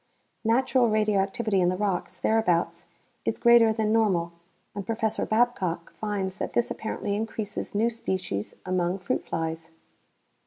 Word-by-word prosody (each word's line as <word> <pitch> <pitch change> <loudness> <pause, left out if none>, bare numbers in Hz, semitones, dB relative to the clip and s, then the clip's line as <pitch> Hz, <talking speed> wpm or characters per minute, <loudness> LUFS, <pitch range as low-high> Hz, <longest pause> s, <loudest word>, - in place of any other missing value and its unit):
Natural 245 +1 +3
radioactivity 210 0 +1
in 175 - +3
the 185 - 0
rocks 190 -2 -2
thereabouts 215 -7 +1 0.4
is - - -1
greater 235 -2 +6
than 220 -1 0
normal 185 -7 +2 0.4
and 200 - -4
Prof. 225 +3 -3 0.3
Babcock 205 -7 +1
finds 200 -3 -3
that - - -3
this 240 - +1
apparently 210 -2 -3
increases 215 -1 -4
new 225 +3 +2
species 185 - -3
among 180 0 0
fruit 185 - -2
flies. 160 0 -3
205 Hz, 130 wpm, -27 LUFS, 185-225 Hz, 0.4 s, greater